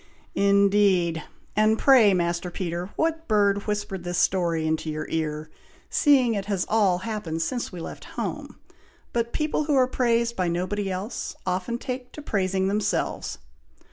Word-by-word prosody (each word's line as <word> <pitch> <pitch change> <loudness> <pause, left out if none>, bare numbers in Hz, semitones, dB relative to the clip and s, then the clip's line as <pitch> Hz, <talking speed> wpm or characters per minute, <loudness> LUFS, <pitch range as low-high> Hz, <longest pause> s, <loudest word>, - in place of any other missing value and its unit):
'" - - -35 0.2
"Indeed! 195 -5 +3 0.3
and 215 +1 +4
pray, 245 -7 +6
Master 170 0 -1
Peter, 175 0 -4
what 325 0 -1
bird 200 -2 +2
whispered 205 -3 -3
this 175 0 -3
story 170 -4 +1
into 160 0 -1
your 155 0 -3
ear, 155 -1 -3 0.4
seeing 265 -6 +4
it 200 -2 -2
has 200 -3 -1
all 205 -5 +3
happened 175 -8 -2
since 245 +6 -3
we 180 - -7
left - - -8
home! - - -4 0.6
but 235 0 0
people 305 0 -1
who 295 -1 +1
are 260 -1 +5
praised 235 -2 +1
by 185 -1 0
nobody 185 +4 -1
else, 190 +5 -4
often 185 +6 -1
take 250 0 -5
to 300 - -8
praising 190 -4 0
themselves!" 205 +2 -1
200 Hz, 155 wpm, -25 LUFS, 175-230 Hz, 0.6 s, pray